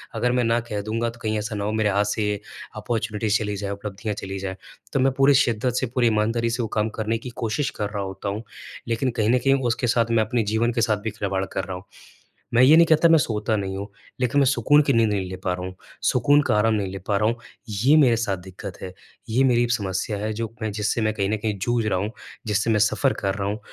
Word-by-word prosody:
अगर 125 - +1
मैं 125 0 +2
ना 115 +1 +2
कह 110 -3 -4
दूँगा 115 +3 -2
तो 115 0 -12
कहीं 110 -1 0
ऐसा 110 +1 -4
ना 100 - -3
हो 105 - -1
मेरे 110 -1 +1
हाथ 100 +1 +2
से 105 +1 -1
ये 105 -1 -1 0.4
अपॉर्च्युनिटी 110 0 -2
चली 105 -2 -1
जाएँ 100 0 -4
उपलब्धियाँ 105 +1 -5
चली 95 -1 -5
जाएँ। 95 0 -4 0.4
तो 135 - +2
मैं 135 +1 +3
पूरी 140 +1 +5
शिद्दत 125 -2 +2
से, 130 - 0
पूरी 120 0 +1
ईमानदारी 115 +2 +1
से 120 +2 -1
वो - - -2
काम 105 +1 +1
करने 110 +1 -1
की 120 +2 -8
कोशिश 120 +4 -2
कर 105 -1 -2
रहा 100 -1 -3
होता 95 +1 -5
हूँ, 105 +3 -4 0.4
लेकिन 115 +3 0
कहीं 110 -2 0
न 125 - +4
कहीं 135 +2 +3
उसके 120 +1 0
साथ 115 0 +3
मैं 115 -1 +3
अपने 115 +1 0
जीवन 110 +3 +1
के 115 - 0
साथ 110 -2 +2
भी 110 - -2
खिलवाड़ 100 -2 -2
कर 95 - -4
रहा 95 - -5
हूँ। 90 - -11 0.7
मैं 120 - +5
ये 145 +5 +8
नहीं 170 - +7
कहता 160 +1 +5
मैं 165 - +7
सोता 110 -4 0
नहीं 95 -2 -3
हूँ, 100 +1 -5 0.3
लेकिन 125 +2 +2
मैं - - +4
सुकून 145 +2 +4
की 140 -2 +1
नींद 115 -2 +3
नहीं 95 -3 -2
ले 95 - -5
पा 90 - 0
रहा 90 0 -5
हूँ। 95 0 -7 0.3
सुकून 145 +1 +4
का 145 - +1
आराम 110 +1 +3
नहीं 100 -3 -1
ले 95 - -6
पा 100 - +2
रहा 105 +2 +2
हूँ, 115 - -1 0.3
ये 115 +8 +3
मेरे 130 -6 +5
साथ 105 -5 -1
दिक्कत 95 +1 -9
है, 90 - -7 0.4
ये 125 +4 +2
मेरी 120 -2 +3
समस्या 100 -2 -1
है 105 +2 -2
जो 115 +1 -4
मैं 110 -1 -2
जिससे 105 +2 -1
मैं 110 0 +1
कहीं 100 -2 -1
न 110 - 0
कहीं 105 -1 -2
जूझ 115 +4 0
रहा 100 -4 +1
हूँ 105 +3 -2 0.4
जिससे 105 +2 +1
मैं 110 -1 +3
सफ़र 130 +6 +2
कर 95 -1 -1
रहा 100 -1 -2
हूँ 105 +2 -3
110 Hz, 265 wpm, -23 LUFS, 100-120 Hz, 0.7 s, ये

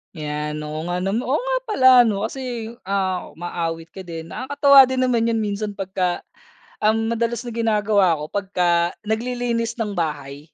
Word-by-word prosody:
'Yan, 150 0 -4
oo 155 +2 -5
nga 180 +1 -2
nama 195 +4 0
oo 260 +3 0
nga - - 0
pala 260 -12 +5 0.2
'no 200 -1 -1
kasi, 235 -2 -4 0.2
ah, 190 -2 -1
umaawit 165 -1 -4
ka 195 - -11
din, 165 0 -7
nakakatuwa 280 -1 +5
din 260 0 -1
naman 235 -2 +2
'yon 230 -1 +1
minsan 205 0 -3
pagka 185 -2 -2 0.6
ang 225 +1 +2
madalas 235 +1 -1
na 240 - -6
ginagawa 210 -5 +2
ko 150 - -5
pagka 180 -4 +1
naglilinis 235 0 -1
ng 210 -2 -1
bahay. 145 -3 -4
205 Hz, 160 wpm, -22 LUFS, 170-235 Hz, 0.6 s, pala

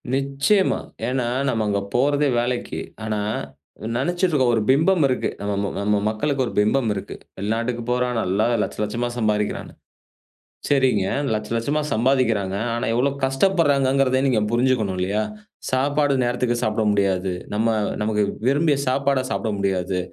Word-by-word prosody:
நிச்சயமா. 140 +9 +1 0.3
ஏன்னா 125 -1 -1 0.2
நம்ம 115 -3 0
அங்க 100 -1 +1 0.2
போறதே 145 +3 +2
வேலைக்கு. 120 +1 -2 0.2
ஆனா, 110 -1 -2 0.8
நெனச்சிட்ருக்கோம் 155 -4 +1
ஒரு 110 - +1
பிம்பம் 160 +5 +4
இருக்கு. 130 - -1
நம்ம 100 0 -2
ம 100 - -2
நம்ம 105 0 +2
மக்களுக்கு 135 +5 -1
ஒரு - - -5
பிம்பம் 115 +3 +2
இருக்கு. 95 - -6 0.2
வெளிநாட்டுக்கு 115 +4 -2
போறான் 125 0 0
நல்லா 100 +3 +1 0.2
1,00,000 105 - -2
1,00,000மா 120 +3 -2
சம்பாரிக்கிறான்னு. 105 -2 -1 1.0
சரிங்க, 130 -8 +2 0.3
1,00,000 110 +2 -2
1,00,000மா 140 +7 0
சம்பாதிக்கிறாங்க. 115 -5 +1 0.2
ஆனா 120 - -2
எவ்ளோ 130 +4 +2
கஷ்டப்பட்றாங்கங்கிறத 135 -4 +2
நீங்க 125 -5 +2
புரிஞ்சுக்கணும் 120 -6 +1
இல்லையா? 100 +4 0 0.5
சாப்பாடு 145 +2 +1
நேரத்துக்கு 120 0 0
சாப்ட 110 +1 0
முடியாது. 95 -2 +1 0.2
நம்ம, 110 +2 +1 0.3
நமக்கு 105 0 +1 0.2
விரும்பிய 145 +2 +3
சாப்பாட 140 +1 +1
சாப்ட 110 - -1
முடியாது. 95 -1 -1
120 Hz, 130 wpm, -22 LUFS, 105-135 Hz, 1.0 s, பிம்பம்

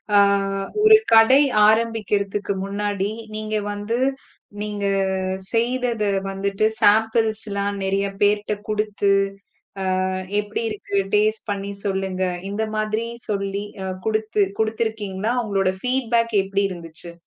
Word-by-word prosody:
ஆ - - +8 0.7
ஒரு 435 0 +9 0.2
கடை 225 +5 +7 0.3
ஆரம்பிக்கறதுக்கு 210 -3 +1
முன்னாடி 200 0 -2 0.2
நீங்க 215 0 -3 0.2
வந்து 205 +3 -2 0.6
நீங்க 210 -1 -3 0.7
செய்ததை 235 -2 +1 0.2
வந்துட்டு 195 +2 0
ஷாம்பிள் 220 +2 +4 0.2
எல்லாம் 200 0 -1
நிறைய 195 +1 0
பேர் 205 +1 +4
கிட்ட 210 - -2
குடுத்து, 210 -1 0 1.0
அ - - -1 0.3
எப்படி 210 +2 -4
இருக்கு 205 -1 -4 0.2
டேஸ்ட் 215 +1 +1
பண்ணி 200 0 -3
சொல்லுங்க, 190 -1 -2 0.3
இந்த 210 +2 -1
மாதிரி 215 +1 -1 0.2
சொல்லி 200 -1 -2 0.4
குடுத்து 215 -1 +1 0.2
குடுத்திருக்கீங்களா? 220 -2 -1
உங்களோட 195 -4 +1
ஃபீட்பேக் 235 -3 +1
எப்படி 195 +1 0
இருந்துச்சு? 170 -1 -9
210 Hz, 110 wpm, -22 LUFS, 200-220 Hz, 1.0 s, ஒரு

